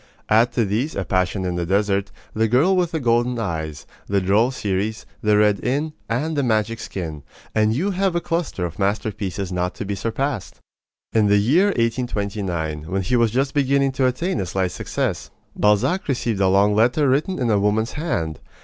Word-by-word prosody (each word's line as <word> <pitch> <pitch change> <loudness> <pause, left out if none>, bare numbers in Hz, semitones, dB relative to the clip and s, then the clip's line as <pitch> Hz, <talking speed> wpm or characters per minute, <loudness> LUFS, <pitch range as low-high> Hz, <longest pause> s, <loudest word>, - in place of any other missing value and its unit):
Add 115 +3 +4
to 115 - +2
these 115 +10 -1
A 100 - -2
Passion 95 +2 0
in 90 - -1
the 85 - -1
Desert, 100 +1 +1 0.2
The 110 +1 +2
Girl 140 - +3
with 180 -2 +2
the 165 -2 -2
Golden 120 -1 +1
Eyes, 80 -8 -4 0.2
The 100 0 +2
Droll 100 +6 +3
Stories, 105 -3 -2 0.2
The 105 -1 +3
Red 105 -1 +3
Inn, 145 +5 -1 0.2
and 150 +8 -1
The 145 - +1
Magic 115 -2 0
Skin, 80 -6 -5 0.3
and 110 0 +2
you 185 +9 0
have 190 -1 0
a - - +3
cluster 165 - -2
of 85 +2 -7
masterpieces 100 -2 -2
not 90 0 -2
to 105 - -5
be 100 - -2
surpassed. 115 +4 -3 0.6
In 110 -2 +4
the 100 0 +4
year 140 - +4
1829, 100 - -2
when 95 +1 -1
he 110 +8 0
was 115 -2 +3
just 130 +5 0
beginning 140 -1 +2
to 130 0 +1
attain 130 - -1
a 95 - -3
slight 95 0 -1
success, - - -3 0.3
Balzac 105 - +2
received 120 -7 -1
a 95 - +4
long 100 +2 +4
letter 125 +7 +3
written 150 +8 +1
in 125 -4 0
a 105 - +3
woman's 105 +3 +1
hand. 85 - -2
110 Hz, 190 wpm, -22 LUFS, 100-130 Hz, 0.6 s, Add